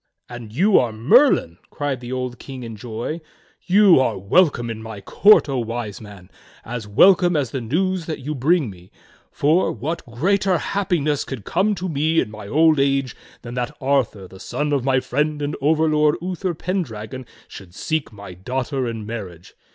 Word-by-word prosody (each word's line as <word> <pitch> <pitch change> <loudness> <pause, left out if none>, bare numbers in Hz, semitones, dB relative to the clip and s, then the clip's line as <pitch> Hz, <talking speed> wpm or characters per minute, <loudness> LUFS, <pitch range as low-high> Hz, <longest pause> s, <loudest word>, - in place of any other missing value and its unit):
"And 120 -3 -9
you 190 - +4
are 120 -2 0
Merlin!" 115 - +3
cried 145 -3 -3
the 120 0 -8
old 125 -2 -4
King 130 -2 -8
in 115 -1 -7
joy. 120 +9 -5 0.5
"You 195 -3 +6
are 120 -5 +1
welcome 120 - +2
at 110 - -5
my 110 -2 -8
court, 205 - +5
O 135 -3 -1
Wise 115 -3 -5
Man, 100 -4 -13 0.3
as 120 -2 -6
welcome 180 - +5
as 135 -6 0
the 135 - -3
news 175 +8 -1
that 160 - -3
you 145 +3 -5
bring 145 - +1
me; 90 -1 -16 0.4
for, 155 +6 +2
what 155 +9 -4
greater 185 - +1
happiness 160 -6 -1
could 130 -7 -7
come 205 - +1
to 185 +1 -4
me 160 +1 +1
in 105 - -1
my 105 -1 -9
old 155 +4 +4
age 135 -2 +1 0.3
than 120 - -7
that 125 +4 -4
Arthur, 130 -8 0
the 95 +1 -14
son 145 +7 -2
of 140 -3 0
my 130 0 +2
friend 150 +4 -1
and 145 +1 -3
overlord 150 0 +3
Uther 180 0 -3
Pen 185 +4 -2
dragon, 115 -2 -7 0.2
should 90 -2 -12
seek 160 -5 -2
my 100 -3 -10
daughter 125 - -3
in 115 -2 -5
marriage. 95 -7 -8
135 Hz, 180 wpm, -21 LUFS, 115-160 Hz, 0.5 s, You